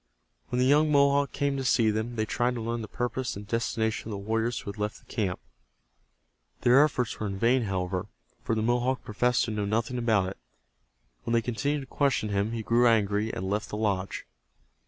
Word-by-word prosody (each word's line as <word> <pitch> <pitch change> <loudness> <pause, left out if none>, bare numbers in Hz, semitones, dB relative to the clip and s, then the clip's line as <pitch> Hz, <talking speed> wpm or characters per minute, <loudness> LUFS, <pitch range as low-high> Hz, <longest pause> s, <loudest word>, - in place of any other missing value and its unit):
When 125 - -2
the 125 - +3
young 150 +3 +4
Mohawk 140 0 +4
came 140 -1 -1
to 135 - -2
see 115 -3 +3
them 110 +3 -3
they 110 -1 0
tried 120 +3 0
to 115 - -4
learn 115 +1 -2
the 110 - -6
purpose 125 +2 -3
and 100 +1 -8
destination 110 -1 -1
of 110 - -4
the - - -3
warriors 110 +4 -1
who 100 - -5
had 105 - -13
left 105 +1 -2
the - - -21
camp. 100 -6 -2 1.2
Their 125 +4 +6
efforts 125 -6 -1
were 110 - -2
in 95 -1 -4
vain, 120 +3 +3
however, 95 0 -2 0.4
for 115 - 0
the 110 - 0
Mohawk 120 +2 +1
professed 120 +3 +1
to 115 - -4
know 105 -1 -1
nothing 115 +4 -1
about 110 -6 +2
it. 95 - -9 0.9
When 115 - -2
they 115 - +3
continued 140 +6 -1
to - - -8
question 135 -4 0
him 100 +2 0
he 115 -1 -3
grew 120 +2 +4
angry, 105 -1 +2
and 95 - -4
left 105 +3 -2
the 105 - -4
lodge. 100 -3 -1
115 Hz, 210 wpm, -28 LUFS, 105-125 Hz, 1.2 s, Their